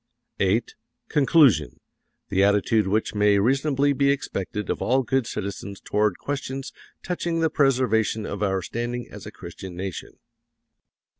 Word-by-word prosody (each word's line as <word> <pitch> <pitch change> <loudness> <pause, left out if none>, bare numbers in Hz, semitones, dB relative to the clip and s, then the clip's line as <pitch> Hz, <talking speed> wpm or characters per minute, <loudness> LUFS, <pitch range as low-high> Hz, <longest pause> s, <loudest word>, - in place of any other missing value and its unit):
VIII. - - +3 0.5
CONCLUSION: 145 - +4 0.5
The 95 0 +2
attitude 100 +1 +3
which 105 +3 0
may 105 -1 +3
reasonably 135 +5 +2
be 140 0 +2
expected 105 -7 -2
of - - -3
all 130 +2 +2
good 130 -1 0
citizens 100 -1 -5
toward 105 -3 0
questions 135 -1 -5 0.3
touching 170 -1 -2
the 160 -1 +1
preservation 120 -6 +2
of 100 0 -5
our 95 -2 0
standing 120 +3 -4
as - - -9
a - - -7
Christian 90 +1 -9
nation. 95 0 -6
115 Hz, 135 wpm, -24 LUFS, 100-135 Hz, 0.5 s, CONCLUSION